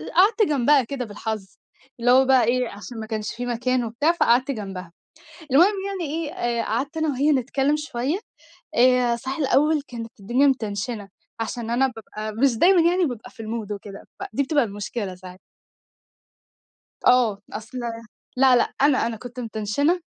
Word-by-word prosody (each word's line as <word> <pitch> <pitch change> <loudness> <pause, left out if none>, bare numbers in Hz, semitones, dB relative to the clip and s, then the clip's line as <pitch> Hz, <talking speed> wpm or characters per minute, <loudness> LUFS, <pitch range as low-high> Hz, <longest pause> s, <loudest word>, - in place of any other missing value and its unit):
قعدت 410 +5 +5
جنبها 285 0 +4
كده 250 +1 -4
بالحظ، 215 -1 -5 0.5
اللي 245 +1 +3
هو 260 +1 +6
بقى 260 -1 +5
إيه، 245 +1 +1
عشان 205 +4 -9
ما 220 - -5
كانش 220 -1 -4
في 245 +1 -4
مكان 245 +1 0
وبتاع 235 +8 +1
فقعدت 260 -5 +2
جنبها، 195 -7 -6 0.6
المهم 345 +10 +5
يعني 390 -3 -3 0.2
إيه - - -8
آآ 240 -8 -1
قعدت 275 +8 -2
أنا 315 0 0
وهي 290 +2 +2
نتكلم 275 +2 +1
شوية 300 +1 -2 0.6
آآ، 250 -1 +4
صحيح 260 +3 -5
الأول 300 +1 +2
كانت 230 -2 -7
الدنيا 240 +8 +2
متنشنة 215 -4 -2 0.3
عشان 225 +1 -4
أنا 255 +3 +3
بابقى 215 -3 -7
مش 260 -5 +4
دايمًا 360 +6 +5
يعني 360 0 +2
بابقى 245 -4 -5
في 255 - -26
المود 220 -1 -5
وكده، 200 -1 -7 0.2
فدي 390 -7 -2
بتبقى 290 0 +2
المشكلة 205 -2 -5
ساعات. 180 0 -12 1.7
آه، 235 -5 +4
أصل 225 +3 -7 0.6
لأ، 260 -1 +6
لأ، 240 - +1
أنا 275 -4 +4
أنا 230 -1 -4
كنت 245 +2 -9
متنشنة 235 - 0
245 Hz, 160 wpm, -23 LUFS, 220-280 Hz, 1.7 s, هو